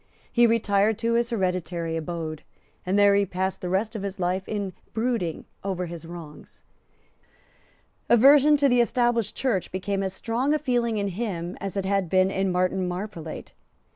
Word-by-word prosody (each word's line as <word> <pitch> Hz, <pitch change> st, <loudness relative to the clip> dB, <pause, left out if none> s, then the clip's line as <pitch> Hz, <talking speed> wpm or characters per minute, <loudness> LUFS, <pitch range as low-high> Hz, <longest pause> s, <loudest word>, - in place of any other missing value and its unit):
He 240 Hz, -1 st, +5 dB
retired 210 Hz, -2 st, +2 dB
to 230 Hz, 0 st, 0 dB
his 235 Hz, 0 st, +1 dB
hereditary 180 Hz, -6 st, -2 dB
abode; 160 Hz, -1 st, -4 dB, 0.5 s
and 190 Hz, +2 st, +2 dB
there 205 Hz, 0 st, +6 dB
he 200 Hz, 0 st, +4 dB
passed 190 Hz, 0 st, -3 dB
the 180 Hz, -, -3 dB
rest 210 Hz, +5 st, -1 dB
of 215 Hz, -, -3 dB
his 200 Hz, -1 st, -5 dB
life 180 Hz, +1 st, 0 dB
in 200 Hz, -3 st, -3 dB, 0.2 s
brooding 225 Hz, -8 st, -1 dB, 0.2 s
over 185 Hz, -2 st, -2 dB
his 170 Hz, -1 st, -8 dB
wrongs. 165 Hz, -3 st, -11 dB, 1.5 s
Aversion 280 Hz, +5 st, +7 dB
to 280 Hz, 0 st, +3 dB
the 245 Hz, -2 st, +4 dB
Established 240 Hz, -3 st, +1 dB
Church 230 Hz, -9 st, -1 dB
became 195 Hz, +1 st, -2 dB
as 190 Hz, -1 st, -2 dB
strong 245 Hz, +8 st, 0 dB
a -, -, +3 dB
feeling 240 Hz, -6 st, 0 dB
in 200 Hz, -1 st, -1 dB
him 185 Hz, -3 st, -4 dB
as 195 Hz, 0 st, -4 dB
it 195 Hz, -, -1 dB
had 195 Hz, -2 st, 0 dB
been 185 Hz, +1 st, +3 dB
in 190 Hz, 0 st, 0 dB
Martin 185 Hz, +1 st, 0 dB
Marprelate. 180 Hz, -3 st, -6 dB
195 Hz, 170 wpm, -25 LUFS, 180-230 Hz, 1.5 s, Aversion